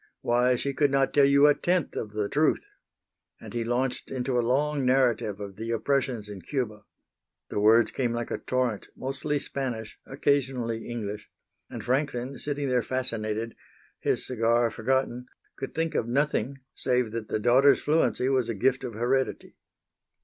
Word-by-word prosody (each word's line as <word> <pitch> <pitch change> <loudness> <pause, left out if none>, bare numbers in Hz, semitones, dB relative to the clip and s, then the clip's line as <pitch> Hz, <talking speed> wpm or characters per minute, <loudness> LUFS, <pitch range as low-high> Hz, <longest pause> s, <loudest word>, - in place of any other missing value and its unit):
"Why, 125 +1 +3
she 140 +3 -2
could 145 +1 +2
not 135 0 +2
tell 140 -1 +6
you 140 +1 +6
a 145 - +7
tenth 175 +2 0
of 105 -1 -4
the 105 -1 -1
truth." 150 - +1 0.7
And - - -10
he 120 -1 -1
launched 125 +2 -1
into 125 -1 -1
a - - +4
long 140 +4 +1
narrative 125 -5 +2
of 100 -2 -7
the 115 +1 -5
oppressions 120 -2 0
in 100 -2 -8
Cuba. 110 - -3 0.7
The - - -1
words 110 +2 +5
came 125 -3 -1
like 120 0 -3
a - - -2
torrent, 125 -5 -1
mostly 140 +3 -2
Spanish, 125 -6 -5
occasionally 130 -5 0
English; 105 -3 -5 0.4
and - - -7
Franklin, 130 -1 -1
sitting 145 -1 -2
there 125 -1 +2
fascinated, 115 -3 -3 0.4
his - - 0
cigar 115 -1 +2
forgotten, 125 +1 -1 0.3
could 135 - -6
think 165 0 -1
of 115 - 0
nothing 135 0 0
save 125 -3 0
that 115 -1 -4
the - - -1
daughter's 125 +6 +5
fluency 150 -4 +2
was 130 -3 +1
a 115 - -1
gift 130 +6 +1
of 125 -3 -5
heredity. 130 +4 -1
125 Hz, 165 wpm, -27 LUFS, 115-135 Hz, 0.7 s, a